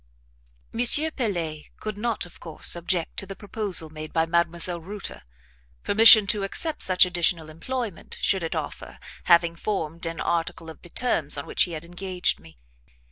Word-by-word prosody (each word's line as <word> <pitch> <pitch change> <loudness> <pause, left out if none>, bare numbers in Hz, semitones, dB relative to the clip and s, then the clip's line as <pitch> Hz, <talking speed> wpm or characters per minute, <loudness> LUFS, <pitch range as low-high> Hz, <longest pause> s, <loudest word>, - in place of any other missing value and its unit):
M. 235 - 0 0.3
PELET 170 - -3
could 215 -1 -5
not 225 0 -2
of 175 - -16
course 165 0 0
object 175 0 -2
to 195 - -2
the 195 - -8
proposal 200 -6 -2
made 155 0 -8
by 160 -1 +1
Mdlle. 170 0 +1
Reuter; 195 - -8 0.6
permission 220 0 +8
to 205 +1 0
accept 300 +11 0
such 185 0 +6
additional 175 -3 0
employment, 220 +4 -6
should 190 - +1
it 165 - -4
offer, - - -6 0.3
having 170 -1 +4
formed 170 -3 -4
an 165 -1 -6
article 165 -1 -3
of - - -16
the 175 - -14
terms 165 - +1
on 140 - -5
which - - +2
he 175 - -8
had 155 +1 -7
engaged 180 +1 -2
me. 80 -2 -18
175 Hz, 165 wpm, -24 LUFS, 165-200 Hz, 0.6 s, permission